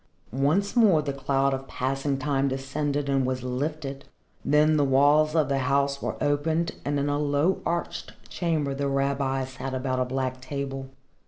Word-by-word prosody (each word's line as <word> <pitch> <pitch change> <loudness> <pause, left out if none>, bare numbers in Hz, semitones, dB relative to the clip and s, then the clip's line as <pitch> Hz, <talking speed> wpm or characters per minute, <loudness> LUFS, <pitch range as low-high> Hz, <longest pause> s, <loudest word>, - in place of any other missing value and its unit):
Once 155 - +1
more 200 -10 +5
the 140 -1 -2
cloud 135 0 +1
of 135 0 -4
passing 135 +2 -1
time 135 0 0
descended 140 +2 -2
and 135 -1 +2
was 130 -1 -2
lifted. 140 +2 -3 0.4
Then 150 +2 +4
the 145 - +3
walls 145 +3 +4
of 155 -4 +3
the 135 0 0
house 140 +1 +1
were - - -3
opened 160 +3 0
and 145 +1 -1
in 140 - 0
a 145 0 0
low 150 +5 +1
arched 170 0 -3
chamber 155 -5 -1
the 140 +1 -2
rabbis 135 -1 0
sat 130 0 -5
about 130 0 -1
a 130 - +1
black 130 0 -3
table. 135 0 -5
140 Hz, 170 wpm, -26 LUFS, 135-150 Hz, 0.4 s, more